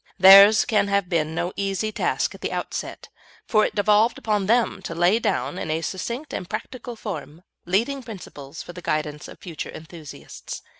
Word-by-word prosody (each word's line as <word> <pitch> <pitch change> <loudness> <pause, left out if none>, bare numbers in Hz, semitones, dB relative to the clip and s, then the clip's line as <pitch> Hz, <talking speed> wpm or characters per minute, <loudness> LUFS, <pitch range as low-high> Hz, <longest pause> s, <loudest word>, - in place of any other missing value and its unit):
Theirs 195 +3 +9
can 210 -4 +2
have 200 -2 0
been 160 -2 0
no 175 +2 -2
easy 200 +2 -2
task - - -1
at - - -13
the - - -3
outset, - - -5 0.4
for 215 -3 +3
it - - -1
devolved 210 +3 +3
upon 210 -3 -1
them 230 -3 +2
to 165 - -6
lay 175 +6 +3
down, 185 - -1
in - - -4
a 160 +1 -1
succinct 235 - -5
and 180 - -5
practical 245 -2 -6
form, 180 -6 -7 0.2
leading 235 +10 0
principles 165 - -9
for 175 - -10
the 180 - -9
guidance 150 -2 -3
of - - -12
future 170 -4 -7
enthusiasts. 155 - -10
195 Hz, 180 wpm, -23 LUFS, 165-215 Hz, 0.4 s, Theirs